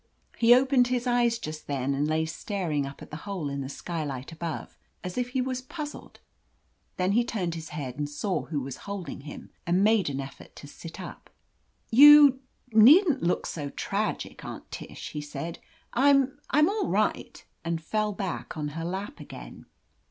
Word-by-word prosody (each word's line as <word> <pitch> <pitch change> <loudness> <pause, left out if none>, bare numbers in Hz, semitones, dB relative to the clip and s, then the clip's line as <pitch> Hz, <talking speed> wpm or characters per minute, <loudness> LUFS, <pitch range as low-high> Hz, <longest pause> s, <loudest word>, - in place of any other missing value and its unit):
He 240 +1 +7
opened 260 -1 +4
his 250 0 -1
eyes 240 -1 +2
just 155 -7 -7
then, 140 -1 -1
and 145 +2 0
lay 160 +1 +1
staring 160 -4 -2
up 135 - -10
at - - -14
the 150 - -5
hole 180 -8 -3
in 140 0 -3
the 135 - -5
skylight 145 -3 -5
above, 165 0 -5 0.3
as 180 0 -5
if 250 0 -1
he 255 0 0
was 255 0 -2
puzzled. 295 +3 -8 0.8
Then 185 +1 +1
he 235 +4 +3
turned 195 -8 -2
his 160 -1 -7
head 140 -4 -5
and 145 0 -2
saw 150 -1 -2
who 150 -4 -3
was 135 0 -6
holding 200 -7 -5
him, 145 +1 -10 0.2
and 180 +3 +3
made 215 -5 +3
an 140 -1 -3
effort 135 0 -9
to - - -11
sit 165 +4 -10
up. 180 - -9 0.6
"You 285 +1 +9 0.2
— - - -34
^needn't 280 - +7
look 175 - 0
so 145 -3 -4
tragic, - - -3
Aunt - - -8
Tish," - - -7
he 150 - -4
said. 165 +3 -6 0.3
"I'm 275 +1 +4
— - - -16
Fm 300 +3 +5
all 415 +1 0
right,'' - - -1 0.2
and 165 -1 -1
fell 215 +6 -1
back 195 -5 -5
on 150 -1 -2
her 165 +3 -5
lap 190 - -4
again. - - -10
180 Hz, 185 wpm, -27 LUFS, 150-245 Hz, 0.8 s, You